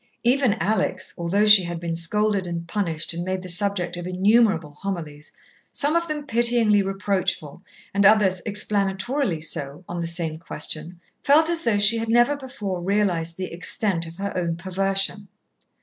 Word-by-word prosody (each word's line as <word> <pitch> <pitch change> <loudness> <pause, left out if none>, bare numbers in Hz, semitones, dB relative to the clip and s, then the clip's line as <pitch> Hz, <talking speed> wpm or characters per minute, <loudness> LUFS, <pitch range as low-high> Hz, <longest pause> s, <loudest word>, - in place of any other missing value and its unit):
Even 250 -2 +2
Alex, 210 +7 -1
although 185 +4 0
she 210 -2 +9
had 170 -1 -5
been 170 -1 -4
scolded 200 +3 0
and 170 -1 -5
punished 170 -5 -3
and 170 +1 -4
made 185 0 -4
the - - -8
subject 180 0 +1
of 175 0 -6
innumerable 190 -3 +2
homilies, 160 -6 -6 0.4
some 290 +3 0
of 335 0 0
them 300 -2 -5
pityingly 235 -4 +3
reproachful, 195 -5 -2 0.3
and 200 +1 +1
others 195 -3 +4
explanatorily 205 - +1
so, 145 +1 -2
on 175 -1 -5
the 170 - -3
same 165 -2 -1
question, 160 +1 -6 0.2
felt 315 +4 +4
as 335 -1 -2
though 220 -3 +2
she 215 +3 +6
had 225 0 -4
never 240 +5 +3
before 230 -10 -6
realized 175 -4 -1
the 185 -2 -6
extent 175 0 0
of 165 +1 -12
her 200 +1 -5
own 170 -2 -2
perversion. 195 +3 -2
195 Hz, 165 wpm, -23 LUFS, 170-215 Hz, 0.4 s, she